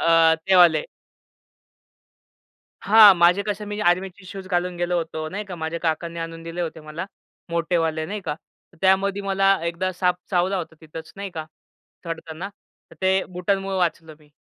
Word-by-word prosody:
अ, 165 -1 +5
ते 190 - +5
वाले. 170 -4 +6 2.0
हां, 210 -1 +8
माझे 175 +3 +4
कसे, 210 0 -3
मी 205 0 -5
आर्मीचे 185 +1 0
शूज 195 0 -8
घालून 180 -1 -1
गेलो 175 0 0
होतो, 160 -1 -4
नाही 205 +4 -5
का. 190 - -7
माझ्या 160 +1 -4
काकांनी 170 +1 -2
आणून 165 0 -6
दिले 165 +1 -6
होते 160 -1 -4
मला, 155 +4 -6 0.4
मोठेवाले 165 -2 0
नाही 210 +3 -4
का. 180 - -3 0.5
त्यामध्ये 195 +1 +2
मला 195 0 +3
एकदा 170 +2 -1
साप 180 0 +1 0.2
चावला 185 +1 +1
होता 165 -3 -5
तिथच, 160 0 -10
नाही 200 0 -5
का 160 -3 -6 0.6
चढताना, 165 +2 -6 0.4
तर - - -14
ते 190 0 +3
बुटांमुळं 195 +2 -1
वाचलो 165 -2 -1
मी. 150 -1 -24
175 Hz, 160 wpm, -23 LUFS, 165-195 Hz, 2.0 s, हां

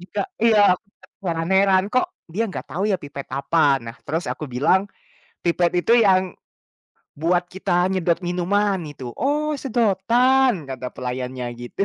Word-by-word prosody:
Jika 180 - -4 0.2
iya, 210 -4 +6
aku 185 - -14 0.4
terheran-heran, 185 +3 +2
"Kok 255 +7 +2 0.3
dia 225 +5 0
nggak - - -6
tahu 190 - -3
ya 195 - +2
pipet 140 -1 -8
apa?" 140 +1 +2
Nah, 115 +2 -8
terus 160 +4 -2
aku 155 - -7
bilang, 165 +11 +2 0.6
"Pipet 170 0 +2
itu 230 - +4
yang 190 -4 +3 0.9
buat 175 +2 +1
kita 180 -1 0
nyedot 175 -3 +1
minuman 190 +3 +1
itu," 130 -4 -8
"Oh 300 +3 0
sedotan!" 240 - +2
kata 130 -1 -5
pelayannya 125 0 -4
gitu. 120 +11 -3
180 Hz, 140 wpm, -22 LUFS, 145-205 Hz, 0.9 s, iya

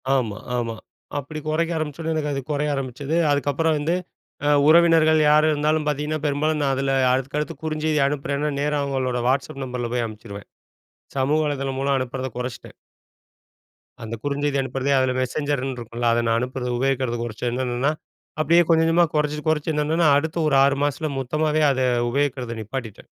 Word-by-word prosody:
ஆமா 110 -6 -1 0.2
ஆமா. 115 -1 -2 0.4
அப்டி 155 +2 -5
குறைக்க 165 +2 0
ஆரம்பிச்ச 155 0 -4
உடனே 160 0 -1
எனக்கு 150 -1 -1
அது 135 - -2
குறைய 150 +1 0
ஆரம்பிச்சது. 135 +3 -3 0.2
அதுக்கப்புறம் 145 +3 +1
வந்து 165 +4 0 0.7
உறவினர்கள் 160 -1 +5
யாரு 155 +1 +5
இருந்தாலும் 150 +1 +1
பார்த்தீங்கன்னா, 150 +1 -1
பெரும்பாலும் 150 +2 0
நான் 135 -2 +1
அதில 135 0 0 0.2
அடுத்துக்கடுத்து 145 +5 -1
குறுஞ்செய்தி 155 -1 0
அனுப்புறேன்னா, 145 +1 -2
நேரா 150 0 0
அவுங்களோட 130 -3 -1
Whatsapp 135 +1 -1
நம்பர்ல 125 -2 -4
போய் 120 -2 0
அனுப்பிச்சிருவேன். 105 -2 -9 0.7
சமூக 145 +4 +2
வலைதளம் 135 -2 -2
மூலம் 140 0 +1
அனுப்புறத 130 +1 -3
குறைச்சிட்டேன். 125 -1 -6 1.3
அந்த 115 +1 -5
குறுஞ்செய்தி 145 0 -1
அனுப்புறதே 135 +1 -2
அதில 130 -1 +1
மெசெஞ்சர்னு 135 0 -2
இருக்கும்ல, 120 0 -2
அத 120 - +2
நான் 115 0 +2
அனுப்புறது 125 0 -3
உபயோகிக்கிறது 130 -2 0
குறைச்சேன் 120 +1 -3
என்னென்னன்னா 125 +3 0 0.5
அப்டியே 170 +3 +5
கொஞ்சம் 165 -1 +4
கொஞ்சமா 170 +1 +4
குறைச்சி 150 0 0
குறைச்சி 155 0 0
என்னென்னன்னா 155 +2 +2
அடுத்த 160 +3 -2
ஒரு 140 - +2
6 140 0 +3
மாசத்தில 150 +2 -2
மொத்தமாவே 155 +4 0
அதை 130 -1 0 0.3
உபயோகிக்கிறத 130 -3 -1
நிப்பாட்டிட்டேன். 110 -1 -7
140 Hz, 155 wpm, -23 LUFS, 130-155 Hz, 1.3 s, உறவினர்கள்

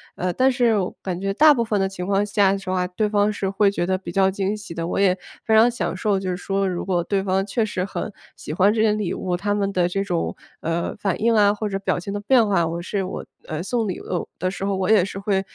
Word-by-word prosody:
呃， 180 0 -1
但 260 +1 +3
是 240 -4 +2
我 185 -2 -1
感 180 -2 -3
觉 195 +1 -1
大 300 +6 +7
部 235 - 0
分 215 -2 0
的 195 - +2
情 180 -2 -6
况 195 +1 +2
下 200 -1 +3
的 195 - -2
话， 180 -1 +1
对 185 +4 -1
方 205 0 +2
是 195 -2 -2
会 200 0 +3
觉 175 - -1
得 185 - +1
比 185 -2 -8
较 190 +1 +3
惊 195 +2 -1
喜 205 -5 -9
的， 165 0 -3
我 - - -1
也 190 -2 +3 0.3
非 220 - +3
常 230 +2 +6
享 240 - -3
受 205 -3 0
就 190 -1 -3
是 180 - -1
说 195 0 -1
如 180 -1 -3
果 180 -2 +1
对 195 +1 -1
方 190 0 0
确 215 +2 0
实 185 -3 -2
很 200 +2 -4 0.2
喜 - - -8
欢 195 +5 +4
这 220 - +1
些 220 - +4
礼 210 -4 -1
物， 180 -1 -2
他 205 +2 -1
们 200 -1 0
的 180 -2 +2
这 195 +2 -1
种， 175 -4 -2 0.2
呃， 165 +1 -2
反 200 -1 -1
应 230 0 +3
啊， 205 -1 +5
或 210 0 -3
者 195 -1 -2
表 195 - 0
情 180 +3 -5
的 205 - -2
变 230 +3 +4
化， 185 -5 +2
我 170 +1 -3
是 195 +2 -2
我， - - -6 0.2
呃， 155 +1 -4
送 225 +2 -1
礼 185 - -4
物 180 - -3
的 185 - -1
时 195 0 -4
候 200 - 0
我 190 0 -1
也 200 -4 +5
是 195 - -7
会 195 -1 0
195 Hz, 300 characters per minute, -22 LUFS, 185-210 Hz, 0.3 s, 大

